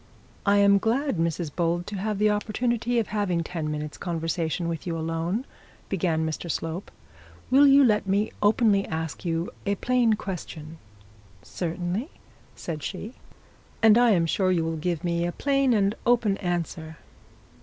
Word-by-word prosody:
'I 200 0 +5
am 200 0 +6
glad, 250 - 0
Mrs 165 -2 -2
Bold, 175 0 0
to 205 - -6
have 210 +2 -2
the 210 +1 +3
opportunity 235 +3 -1
of 230 - 0
having 190 -5 0
ten 160 -2 -4
minutes' 150 0 -5
conversation 165 -1 -2
with 165 +1 -4
you 165 -1 -2
alone,' 165 +8 -2 0.4
began 165 -4 0
Mr 160 +2 -4
Slope. 165 +4 -3 0.6
'Will 280 +2 +7
you 275 +1 +7
let 210 -5 +2
me 200 +3 +1
openly 205 -1 +3
ask 160 +1 -4
you 165 0 -1 0.2
a 200 - +2
plain 245 +1 +2
question?' 165 -6 -6 0.6
'Certainly,' 180 - -3 0.5
said 155 -3 -5
she. 205 - -6 0.7
'And 220 -1 +8
I 240 0 +5
am 175 -6 +3
sure 185 +3 +1
you 170 -3 +1
will 165 0 -2
give 170 +1 -2
me 170 -1 0
a 175 - -1
plain 275 +4 +1
and 205 -3 +2
open 230 -4 +3
answer.' 170 -3 -3
185 Hz, 155 wpm, -26 LUFS, 165-215 Hz, 0.7 s, And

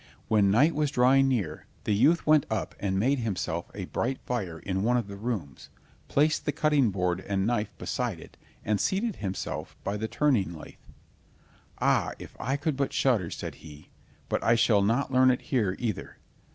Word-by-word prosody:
When 105 -3 +4
night 140 +11 +4
was 150 -1 +1
drawing 135 0 +4
near, 100 -13 -2 0.2
the 105 - 0
youth 155 +12 +3
went 155 -2 +4
up 110 - -2
and 95 -2 -1
made 130 +7 +2
himself 90 -6 -3
a 95 -2 -4
bright 130 +8 -2
fire 95 -10 -3
in 95 +3 -3
one 120 +4 +2
of 115 -4 -2
the 100 - -7
rooms, 100 - -5 0.4
placed 155 +2 +2
the - - +1
cutting 150 -6 +2
board 90 -2 -1
and 95 0 -1
knife 110 -2 -1
beside - - -3
it, - - -13 0.3
and 105 -1 +1
seated 205 +3 0
himself 95 -2 -5
by 100 +1 -2
the 110 +1 -3
turning 110 - +1
lathe. 80 - -11 1.0
"Ah, - - +2
if - - -11
I 135 +5 -1
could 150 0 -1
but 140 0 -1
shudder!" 110 -11 +2
said - - -6
he, 75 -2 -13 0.4
"but - - -1
I 115 - +4
shall 115 -3 +4
not 120 +7 +1
learn 130 0 +6
it 125 - +1
here 105 -8 0
either." 115 -5 -4
115 Hz, 185 wpm, -28 LUFS, 95-135 Hz, 1.0 s, learn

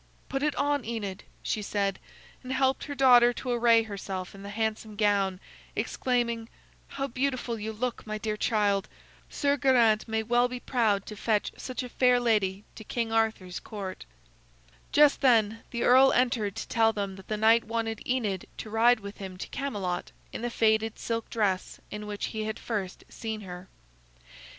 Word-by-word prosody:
"Put 270 - -2
it 300 0 +1
on, 290 -2 +1
Enid," 210 -4 -5 0.2
she 215 - -1
said, 200 -1 -1 0.4
and 255 - -7
helped 265 0 +1
her 285 - -5
daughter 245 -3 +7
to 250 +1 -4
array 235 -1 +5
herself 195 -3 -5
in 195 - -11
the 200 - -7
handsome 220 0 -2
gown, 200 -3 +2 0.4
exclaiming: 235 -2 -1 0.4
"How 275 - -3
beautiful 255 -3 -2
you 215 +1 -3
look, 235 +1 -4
my 215 0 -3
dear 215 0 -2
child! 205 -3 +1 0.4
Sir 285 0 +1
Geraint 240 -6 +4
may 220 0 -1
well 240 +2 +3
be 250 0 -6
proud 220 -7 +1
to 215 - -8
fetch 210 0 0
such 255 0 -5
a 250 - -7
fair 250 0 +4
lady 210 -5 +1
to 220 - -10
King 230 +1 -2
Arthur's 220 -5 0
Court." 195 -4 -7 0.9
Just 295 -1 +5
then 225 -4 +3
the 235 - -2
earl 260 +2 +7
entered 235 -5 +1
to - - -5
tell 225 -2 +3
them 200 -3 -3
that 190 -1 -13
the 215 - -2
knight 225 +2 +4
wanted 225 -1 -2
Enid 215 -8 -1
to 215 - -7
ride 230 +1 +4
with 200 +1 -8
him 190 -2 -7
to - - -6
Camelot 200 -11 -3 0.2
in - - -5
the 240 - -1
faded 220 -1 +2
silk 230 -1 -3
dress 200 -4 -1
in 210 0 -6
which 205 -1 -3
he 220 -1 -2
had 220 0 -3
first 200 -5 -4
seen 220 -2 -5
her. 180 -1 -9
225 Hz, 175 wpm, -28 LUFS, 205-245 Hz, 0.9 s, daughter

